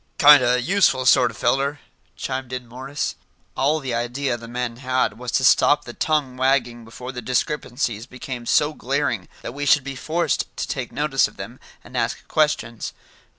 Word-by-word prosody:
"Kind 145 Hz, -1 st, +9 dB
o' 125 Hz, 0 st, +3 dB
useful 130 Hz, -2 st, +2 dB
sort 125 Hz, -1 st, +5 dB
er 115 Hz, -, -10 dB
feller," 140 Hz, +4 st, 0 dB, 0.4 s
chimed 130 Hz, -1 st, -4 dB
in 125 Hz, -1 st, -4 dB
Morris. 130 Hz, +5 st, -4 dB, 0.4 s
All 145 Hz, +4 st, +2 dB
the 130 Hz, -4 st, -4 dB
idea 120 Hz, +2 st, -1 dB
the 115 Hz, -1 st, -9 dB
men 120 Hz, 0 st, -4 dB
had 130 Hz, -3 st, -1 dB
was 125 Hz, -1 st, -5 dB
to 130 Hz, -, +2 dB
stop 140 Hz, +4 st, +4 dB
the 120 Hz, -, -8 dB
tongue 145 Hz, -4 st, 0 dB
wagging 130 Hz, -3 st, +1 dB
before 125 Hz, +3 st, -8 dB
the 125 Hz, -1 st, -6 dB
discrepancies 125 Hz, -2 st, -2 dB
became 125 Hz, -2 st, -7 dB
so 150 Hz, +1 st, +3 dB
glaring -, -, -1 dB, 0.2 s
that -, -, -5 dB
we 145 Hz, +1 st, -3 dB
should 140 Hz, 0 st, +5 dB
be 135 Hz, 0 st, -6 dB
forced 165 Hz, +6 st, -1 dB
to -, -, -2 dB
take 130 Hz, -3 st, -4 dB
notice 145 Hz, -2 st, +2 dB
of -, -, -17 dB
them, -, -, -8 dB, 0.2 s
and -, -, -13 dB
ask -, -, -2 dB
questions. 135 Hz, -7 st, 0 dB
130 Hz, 180 wpm, -22 LUFS, 120-140 Hz, 0.4 s, Kind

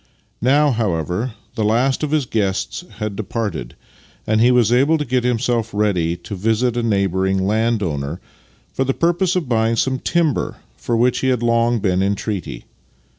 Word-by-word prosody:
Now, 145 Hz, +4 st, +4 dB
however, 105 Hz, -, -1 dB, 0.2 s
the 110 Hz, -, -2 dB
last 120 Hz, +5 st, +2 dB
of 150 Hz, -, -1 dB
his 150 Hz, -2 st, +1 dB
guests 105 Hz, -, -2 dB
had 105 Hz, -2 st, -3 dB
departed, 100 Hz, -, -4 dB, 0.5 s
and 110 Hz, 0 st, +2 dB
he 120 Hz, -, +5 dB
was 120 Hz, -2 st, +4 dB
able 140 Hz, +6 st, +4 dB
to 150 Hz, -, -3 dB
get 125 Hz, -1 st, 0 dB
himself 120 Hz, -2 st, 0 dB
ready 90 Hz, -5 st, +1 dB
to 90 Hz, -, -9 dB
visit 115 Hz, +5 st, 0 dB
a 120 Hz, -, 0 dB
neighbouring 95 Hz, -3 st, +1 dB
landowner, 100 Hz, -9 st, -1 dB, 0.5 s
for 130 Hz, -, 0 dB
the 135 Hz, 0 st, -1 dB
purpose 175 Hz, +2 st, +1 dB
of 175 Hz, -6 st, -1 dB
buying 115 Hz, -1 st, +1 dB
some 130 Hz, +3 st, 0 dB
timber 165 Hz, -2 st, 0 dB, 0.2 s
for 120 Hz, -, -2 dB
which 125 Hz, +2 st, +2 dB
he 130 Hz, -, -1 dB
had 125 Hz, -2 st, +1 dB
long 115 Hz, 0 st, +2 dB
been 95 Hz, -3 st, +1 dB
in 100 Hz, +1 st, +1 dB
treaty. 100 Hz, -4 st, -5 dB
115 Hz, 170 wpm, -20 LUFS, 100-125 Hz, 0.5 s, he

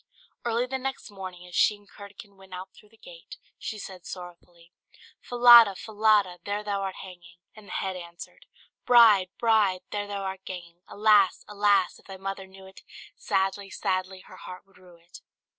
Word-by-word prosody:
Early 235 Hz, +1 st, 0 dB
the 265 Hz, +1 st, -4 dB
next 270 Hz, -3 st, -5 dB
morning, 185 Hz, -3 st, -9 dB
as 180 Hz, -, -15 dB
she 210 Hz, -, +3 dB
and 205 Hz, 0 st, -22 dB
Curdken 200 Hz, 0 st, -13 dB
went 190 Hz, -1 st, -12 dB
out 185 Hz, +1 st, -9 dB
through 210 Hz, -, -20 dB
the 225 Hz, -, -24 dB
gate, -, -, -13 dB, 0.2 s
she 220 Hz, -, -6 dB
said 190 Hz, -3 st, -10 dB
sorrowfully 175 Hz, -1 st, -11 dB, 0.5 s
"Falada, 240 Hz, -4 st, +7 dB
Falada, 210 Hz, -4 st, +1 dB
there 205 Hz, +1 st, -3 dB
thou 200 Hz, -1 st, -2 dB
art 195 Hz, -1 st, -4 dB
hanging!" 175 Hz, -2 st, -13 dB, 0.2 s
and 215 Hz, -2 st, -15 dB
the -, -, -11 dB
head 190 Hz, -1 st, -3 dB
answered 170 Hz, -, -11 dB, 0.4 s
"Bride, 220 Hz, -6 st, +6 dB
bride, 215 Hz, -5 st, +2 dB
there 205 Hz, 0 st, -3 dB
thou 200 Hz, -1 st, -5 dB
art 190 Hz, 0 st, -6 dB
ganging! 175 Hz, -2 st, -9 dB
Alas! 205 Hz, -2 st, +3 dB
alas! 205 Hz, -2 st, +1 dB
if -, -, -23 dB
thy 195 Hz, -1 st, -9 dB
mother 195 Hz, 0 st, -6 dB
knew 190 Hz, 0 st, -15 dB
it, 190 Hz, 0 st, -15 dB, 0.3 s
Sadly, 195 Hz, +1 st, -1 dB
sadly 185 Hz, 0 st, -3 dB
her 185 Hz, -, -15 dB
heart 185 Hz, 0 st, -11 dB
would 195 Hz, -1 st, -24 dB
rue 180 Hz, -1 st, -18 dB
it." 170 Hz, +1 st, -16 dB
195 Hz, 175 wpm, -26 LUFS, 185-210 Hz, 0.5 s, Falada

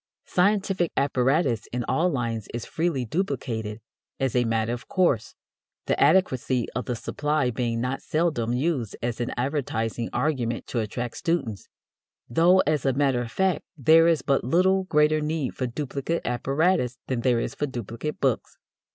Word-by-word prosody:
Scientific 190 Hz, -2 st, +1 dB
apparatus 135 Hz, -, +1 dB
in 125 Hz, 0 st, -3 dB
all 170 Hz, +9 st, +1 dB
lines 115 Hz, -, -2 dB
is 120 Hz, -, -4 dB
freely 160 Hz, -6 st, -1 dB
duplicated 115 Hz, -, -3 dB, 0.4 s
as 135 Hz, -2 st, 0 dB
a 125 Hz, -1 st, +3 dB
matter 115 Hz, 0 st, 0 dB
of 120 Hz, -1 st, -7 dB
course, 140 Hz, -, +1 dB, 0.5 s
the -, -, 0 dB
adequacy 130 Hz, -9 st, +3 dB
of 125 Hz, -1 st, -3 dB
the 125 Hz, -, -2 dB
supply 145 Hz, +2 st, -1 dB
being 115 Hz, 0 st, -1 dB
not 125 Hz, +3 st, -2 dB
seldom 155 Hz, -8 st, 0 dB
used 130 Hz, -, -1 dB
as 120 Hz, 0 st, -2 dB
an 120 Hz, -, -2 dB
advertising 120 Hz, -4 st, -2 dB
argument 125 Hz, -7 st, -1 dB
to 120 Hz, -, -2 dB
attract 115 Hz, +2 st, -4 dB
students; 165 Hz, -, -2 dB, 0.6 s
though, 175 Hz, +9 st, +5 dB
as 150 Hz, -3 st, +1 dB
a 135 Hz, -, +2 dB
matter 135 Hz, -2 st, +2 dB
of 115 Hz, -1 st, -6 dB
fact, 190 Hz, -2 st, +1 dB
there 160 Hz, +4 st, +6 dB
is 165 Hz, -2 st, +2 dB
but 140 Hz, -1 st, +1 dB
little 185 Hz, +7 st, +3 dB
greater 150 Hz, -2 st, +3 dB
need 150 Hz, -3 st, -2 dB
for 130 Hz, -, -2 dB
duplicate 140 Hz, +5 st, -3 dB
apparatus 135 Hz, +2 st, +1 dB
than 130 Hz, -2 st, -2 dB
there 120 Hz, -1 st, +2 dB
is -, -, -3 dB
for 145 Hz, -, -2 dB
duplicate 120 Hz, +3 st, -5 dB
books. 130 Hz, -4 st, -1 dB
130 Hz, 160 wpm, -25 LUFS, 120-160 Hz, 0.6 s, there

